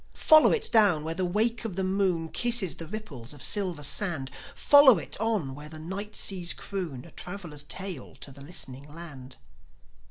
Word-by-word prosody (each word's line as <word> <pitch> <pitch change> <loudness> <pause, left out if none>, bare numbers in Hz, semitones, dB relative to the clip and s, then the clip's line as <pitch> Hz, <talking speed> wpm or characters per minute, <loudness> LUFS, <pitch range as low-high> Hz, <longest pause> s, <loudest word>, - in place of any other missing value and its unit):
Follow 310 -1 +6
it 450 - 0
down 200 -9 +4
where 160 +1 -3
the 185 +3 -3
wake 225 +6 0
of 220 -6 -5
the 190 - -2
moon 185 -3 0
Kisses 235 -5 0
the 165 - -8
ripples 155 - -8
of 145 -3 -9
silver 185 -7 +1
sand; 150 -6 0 0.2
Follow 285 -6 +7
it 160 - -7
on 210 -12 -1
where 150 +2 -10
the 160 - -9
night 195 +6 -6
seas 180 -3 +1
croon 170 -11 -5
A 170 - -14
traveller's 175 -6 -5
tale 180 0 -6
to 140 - -10
the 140 +1 -14
listening 140 -4 -5
land. 145 -6 -10
175 Hz, 180 wpm, -27 LUFS, 150-205 Hz, 0.2 s, Follow